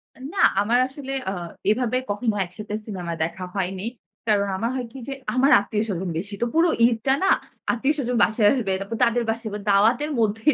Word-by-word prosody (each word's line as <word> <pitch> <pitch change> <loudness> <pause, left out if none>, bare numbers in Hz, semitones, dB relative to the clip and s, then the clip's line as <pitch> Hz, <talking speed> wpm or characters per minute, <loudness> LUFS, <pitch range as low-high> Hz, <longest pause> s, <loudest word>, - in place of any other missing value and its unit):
অ্যা - - -17
না, 390 - 0 0.2
আমার 235 +4 +2
আসলে 270 0 -8 0.2
আ - - -3 0.4
এভাবে 245 +2 +1
কখনো 210 +1 -1
একসাথে 210 +4 -8
সিনেমা 180 -5 -4
দেখা 175 +3 -4
হয়নি। 190 +1 -2 0.4
কারণ 200 -2 +3
আমার 230 +4 -1
হয় 250 -2 -2
কি 270 - -10
যে, 275 - -3 0.2
আমার 270 +3 +4
আত্মীয়-স্বজন 200 -3 -2
বেশি। 200 +4 -5
তো - - +3
পুরো 330 +1 +4 0.2
ঈদটা 240 +3 +1
না? 390 - +3 0.4
আত্মীয়-স্বজন 250 -1 0
বাসায় 215 -1 +3
আসবে, 225 -8 -1
তারপর 220 +3 -4
তাদের 235 0 +1
বাসায় 225 -1 -2
ব - - -2 0.2
দাওয়াতের 235 +9 +3
মধ্যেই 225 +7 +2
225 Hz, 180 wpm, -24 LUFS, 205-255 Hz, 0.4 s, আমার